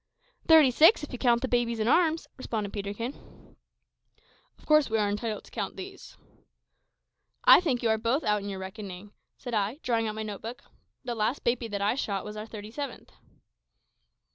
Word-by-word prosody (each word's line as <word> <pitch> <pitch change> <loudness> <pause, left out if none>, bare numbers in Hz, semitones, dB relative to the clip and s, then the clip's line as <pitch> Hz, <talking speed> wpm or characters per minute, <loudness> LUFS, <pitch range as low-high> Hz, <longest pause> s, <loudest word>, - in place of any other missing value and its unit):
"Thirty 315 -5 +7
six, 320 - +6
if 295 - -7
you 250 - -5
count 240 -2 +3
the - - +1
babies 240 -2 0
in 215 - 0
arms," 325 +3 +3
responded 215 -6 -4
Peterkin. 205 +5 -7 1.0
"Of - - -21
course 305 -4 +4
we 220 - +1
are 210 -1 +2
entitled 210 +1 -3
to - - -18
count - - -4
these." 380 0 -10 1.3
"I - - +8
think 265 -9 -1
you 230 - +2
are 220 0 +2
both 235 +7 0
out 210 -1 +1
in 200 - -5
your 195 - -5
reckoning," 190 0 -8 0.3
said 245 -3 -7
I, 210 +4 0
drawing 230 -2 0
out 215 - -4
my 220 - -4
note 210 -2 -6
book; 230 +2 -8 0.4
"the 245 -2 -3
last 230 +4 -1
baby 240 0 0
that 200 -2 -3
I 205 - +2
shot 200 -7 -3
was 210 0 -7
our 215 +1 -6
thirty 215 -1 -9
seventh." 280 0 -7
230 Hz, 190 wpm, -28 LUFS, 210-255 Hz, 1.3 s, I